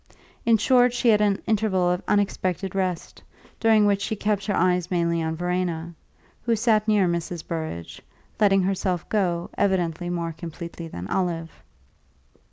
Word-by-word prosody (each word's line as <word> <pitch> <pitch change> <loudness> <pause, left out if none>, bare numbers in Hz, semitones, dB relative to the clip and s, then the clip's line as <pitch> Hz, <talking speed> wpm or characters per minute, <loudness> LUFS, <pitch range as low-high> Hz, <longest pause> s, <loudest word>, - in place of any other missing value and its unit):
In 230 -1 +6
short, 245 +2 +4
she 245 -1 +2
had 210 -1 +5
an 205 -1 +1
interval 200 -5 +1
of 180 - -1
unexpected 195 -2 0
rest, 185 -3 -3 0.4
during 220 -2 +4
which 200 -1 +2
she 220 - -2
kept 205 -1 -1
her 205 - +1
eyes 180 0 +1
mainly 170 -2 +1
on 160 0 -2
Verena, 175 -1 -2 0.5
who 230 -1 +1
sat 215 -1 +2
near 205 -4 +3
Mrs. 170 -1 -3
Burrage, 160 - -5 0.4
letting 195 -3 +4
herself 185 -2 -1
go, 175 -5 0
evidently, 175 -3 0
more 170 -1 -2
completely 170 +1 -8
than 90 - -7
Olive. 170 - -2
185 Hz, 150 wpm, -24 LUFS, 170-205 Hz, 0.5 s, In